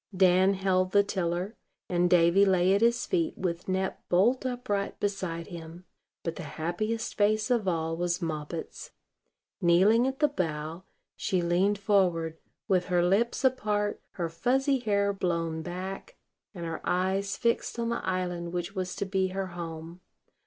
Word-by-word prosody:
Dan 185 Hz, +1 st, +5 dB
held 185 Hz, -1 st, +1 dB
the 200 Hz, 0 st, +6 dB
tiller, 185 Hz, +1 st, -2 dB, 0.3 s
and 175 Hz, 0 st, +2 dB
Davy 175 Hz, +2 st, +5 dB
lay 190 Hz, -1 st, +4 dB
at 200 Hz, -, +2 dB
his 235 Hz, +1 st, +3 dB
feet, 335 Hz, -4 st, 0 dB
with 175 Hz, -1 st, -3 dB
Nep 190 Hz, 0 st, -1 dB
bolt 235 Hz, +9 st, +3 dB
upright 245 Hz, -6 st, -2 dB
beside 185 Hz, -5 st, -2 dB
him; 170 Hz, 0 st, -10 dB, 0.4 s
but 165 Hz, -1 st, -3 dB
the -, -, -5 dB, 0.2 s
happiest 215 Hz, +8 st, -2 dB
face 215 Hz, +3 st, +2 dB
of 230 Hz, -5 st, +1 dB
all 165 Hz, -2 st, 0 dB
was 175 Hz, +1 st, -1 dB
Moppet's. 160 Hz, -1 st, -5 dB, 0.7 s
Kneeling 195 Hz, +8 st, +5 dB
at 265 Hz, 0 st, -2 dB
the 300 Hz, -, +4 dB
bow, 165 Hz, -, -3 dB, 0.3 s
she 185 Hz, -2 st, 0 dB
leaned 185 Hz, +4 st, +2 dB
forward, 180 Hz, -5 st, +1 dB, 0.3 s
with 185 Hz, -4 st, +2 dB
her 175 Hz, -2 st, +2 dB
lips 210 Hz, +9 st, +1 dB
apart, 210 Hz, -5 st, +1 dB
her 170 Hz, -2 st, -2 dB
fuzzy 265 Hz, -, +1 dB
hair 200 Hz, -3 st, +1 dB
blown 165 Hz, -4 st, -1 dB
back, 185 Hz, -, -6 dB, 0.4 s
and 170 Hz, -2 st, -5 dB
her 165 Hz, -1 st, -4 dB
eyes 195 Hz, +2 st, 0 dB
fixed 235 Hz, 0 st, 0 dB
on 235 Hz, 0 st, -1 dB
the 235 Hz, -, -2 dB
island 180 Hz, -2 st, -2 dB
which 175 Hz, +2 st, -3 dB
was 185 Hz, -2 st, -3 dB
to -, -, -2 dB
be 190 Hz, -1 st, 0 dB
her 190 Hz, +1 st, -3 dB
home. 165 Hz, 0 st, -7 dB
185 Hz, 155 wpm, -28 LUFS, 175-205 Hz, 0.7 s, the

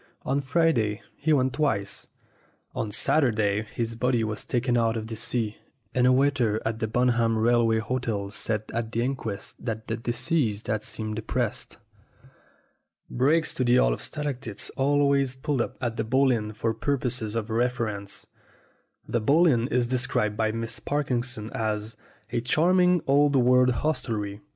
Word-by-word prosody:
On 140 Hz, +2 st, 0 dB
Friday 130 Hz, -8 st, +1 dB
he 155 Hz, +2 st, -1 dB
went 130 Hz, -3 st, +3 dB
twice. 105 Hz, -10 st, -1 dB, 0.7 s
On 110 Hz, -, -2 dB
Saturday 110 Hz, -3 st, +2 dB
his 115 Hz, +1 st, -4 dB
body 120 Hz, 0 st, +1 dB
was 110 Hz, -1 st, -3 dB
taken 120 Hz, 0 st, 0 dB
out 115 Hz, -1 st, +2 dB
of 110 Hz, -, -4 dB
the 110 Hz, 0 st, -6 dB
sea, 115 Hz, -1 st, -2 dB, 0.4 s
and 125 Hz, 0 st, +3 dB
a -, -, +6 dB
waiter 130 Hz, -5 st, +2 dB
at 110 Hz, 0 st, -2 dB
the 110 Hz, -, -1 dB
Bunham 115 Hz, -1 st, +2 dB
Rail 120 Hz, +1 st, +3 dB
way 110 Hz, 0 st, +2 dB
Hotel 110 Hz, -3 st, -2 dB
said 110 Hz, 0 st, -2 dB
at 115 Hz, -1 st, -2 dB
the 115 Hz, 0 st, 0 dB
inquest 120 Hz, -6 st, -5 dB
that 110 Hz, -2 st, -4 dB
the 115 Hz, -, -1 dB
deceased 120 Hz, -1 st, 0 dB
had 110 Hz, -1 st, -1 dB
seemed 110 Hz, 0 st, -4 dB
depressed. 110 Hz, 0 st, -2 dB, 1.3 s
Brakes 150 Hz, +6 st, +2 dB
to 130 Hz, -, -1 dB
the 120 Hz, 0 st, +4 dB
Hall -, -, +4 dB
of -, -, -6 dB
Stalactites 130 Hz, -8 st, -4 dB
always 140 Hz, -1 st, +2 dB
pulled 130 Hz, 0 st, -1 dB
up -, -, -4 dB
at 120 Hz, -2 st, -3 dB
the -, -, 0 dB
Bull 130 Hz, +4 st, +3 dB
Inn 110 Hz, -3 st, -1 dB
for 115 Hz, +1 st, -1 dB
purposes 125 Hz, -3 st, -2 dB
of 115 Hz, -1 st, -3 dB
reference. 110 Hz, -4 st, -2 dB, 0.8 s
The 120 Hz, -, 0 dB
Bull 150 Hz, +10 st, +4 dB
Inn 120 Hz, -7 st, +3 dB
is 125 Hz, -3 st, +1 dB
described 120 Hz, -4 st, 0 dB
by 110 Hz, 0 st, +1 dB
Miss 115 Hz, +1 st, -4 dB
Parkinson 125 Hz, -6 st, -2 dB
as 110 Hz, 0 st, -2 dB, 0.4 s
"a 120 Hz, -, 0 dB
charming 180 Hz, +6 st, +3 dB
old 145 Hz, +1 st, +4 dB
world 125 Hz, 0 st, +5 dB
hostelry." 115 Hz, -7 st, -2 dB
120 Hz, 160 wpm, -26 LUFS, 110-130 Hz, 1.3 s, a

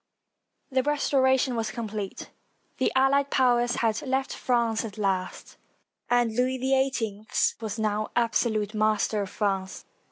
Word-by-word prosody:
] -, -, -50 dB
The 260 Hz, 0 st, +2 dB
restoration 265 Hz, -2 st, +2 dB
was 225 Hz, -1 st, -1 dB
complete. 215 Hz, -4 st, -6 dB, 0.5 s
The 260 Hz, -, +2 dB
allied 275 Hz, +1 st, +3 dB
powers 245 Hz, -3 st, +2 dB
had 220 Hz, 0 st, +1 dB
left 265 Hz, 0 st, -1 dB
France 235 Hz, -3 st, 0 dB
at 220 Hz, -1 st, -7 dB
last, 190 Hz, -3 st, -2 dB, 0.5 s
and 240 Hz, -2 st, +2 dB
Louis 255 Hz, +2 st, +1 dB
XVIII 255 Hz, -5 st, -1 dB, 0.3 s
was 220 Hz, 0 st, -4 dB
now 215 Hz, -1 st, -1 dB
absolute 225 Hz, -3 st, +1 dB
master 215 Hz, 0 st, +1 dB
of 195 Hz, -, -4 dB
France. 195 Hz, -2 st, -2 dB
230 Hz, 130 wpm, -26 LUFS, 215-260 Hz, 0.5 s, allied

